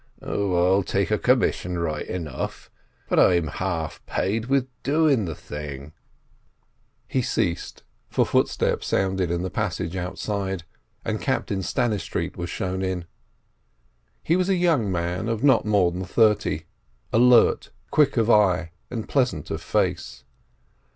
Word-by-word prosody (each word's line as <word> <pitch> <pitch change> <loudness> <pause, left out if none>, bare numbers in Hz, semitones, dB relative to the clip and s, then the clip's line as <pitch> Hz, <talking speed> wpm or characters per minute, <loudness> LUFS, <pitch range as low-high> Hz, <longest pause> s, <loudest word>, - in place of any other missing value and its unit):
Oh, 100 -3 -1 0.2
I'll 100 - +4
take 90 - -1
a - - +2
commission 90 0 +1
right 80 -3 -2
enough, 80 -7 -5 0.4
but - - +2
I'm 85 -3 +5
half 80 0 -3
paid 110 +4 -1
with 135 -1 +2
doing 145 -6 +2
the 80 -3 -4
thing—" 75 0 -8 1.1
He 130 - 0
ceased, 85 -7 -2 0.3
for - - +2
footsteps - - +1
sounded 95 -2 0
in 85 +1 -1
the 95 - -3
passage 90 -4 -2
outside, 95 0 -3 0.4
and - - -2
Captain 100 - -1
Stannistreet 105 +2 -1
was 85 -1 -5
shown 95 0 -3
in. 95 -2 -2 1.2
He 165 - +2
was 185 +1 +1
a 195 - +3
young 160 - +2
man 90 +5 -2
of 115 +1 -2
not 130 -7 +4
more 100 -5 +3
than 90 +2 -4
thirty, 105 +2 +2 0.5
alert, 120 +1 +5 0.2
quick 145 -4 +3
of 115 -2 +3
eye, 90 -7 +3 0.2
and 115 -3 -5
pleasant 130 -3 0
of - - -3
face. - - -1
95 Hz, 135 wpm, -24 LUFS, 85-115 Hz, 1.2 s, I'm